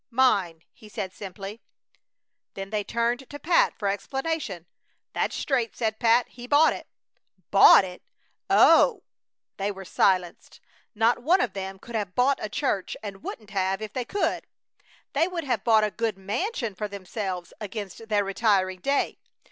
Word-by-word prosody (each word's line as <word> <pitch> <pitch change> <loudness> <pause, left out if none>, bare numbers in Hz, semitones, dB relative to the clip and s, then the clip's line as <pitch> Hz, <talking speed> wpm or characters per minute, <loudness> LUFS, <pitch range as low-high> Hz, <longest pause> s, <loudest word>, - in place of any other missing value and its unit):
"Mine," 200 -10 +2
he 215 - -16
said, 190 -2 -5
simply. 200 +3 -8 0.9
Then 195 0 -6
they 210 -1 -1
turned 235 +4 -1
to 290 - -7
Pat 335 +3 +2
for 205 - -2
explanation. 250 - -3 0.5
"That's - - -1
straight," 245 -5 -1
said 220 -2 -1
Pat. 235 +1 +4
"He 245 0 -11
bought 295 +4 +5
it." - - -9 0.6
"Bought 195 -1 +8
it! 180 -1 -9 0.5
Oh!" 430 -7 +5 0.5
They 200 +1 -1
were 195 -1 -9
silenced. 180 -1 0 0.4
Not 225 +3 +2
one 340 +9 +4
of - - 0
them 195 0 -5
could 235 +5 -12
have 205 -5 -3
bought 265 +3 +3
a 215 - -3
church, 235 -6 -2
and 195 -2 -7
wouldn't 215 -2 -8
have 190 -1 0
if 215 -1 -7
they 255 - -2
could. 405 - -1 0.7
They 330 - +2
would 355 -3 -4
have 245 -8 -1
bought 220 -2 +4
a 210 - 0
good 225 -3 -2
mansion 225 - -3
for 210 +3 -4
themselves 190 -2 -5
against 210 +1 -7
their 205 -1 +2
retiring 195 -2 +1
day. 275 +8 0
215 Hz, 160 wpm, -26 LUFS, 195-245 Hz, 0.9 s, Bought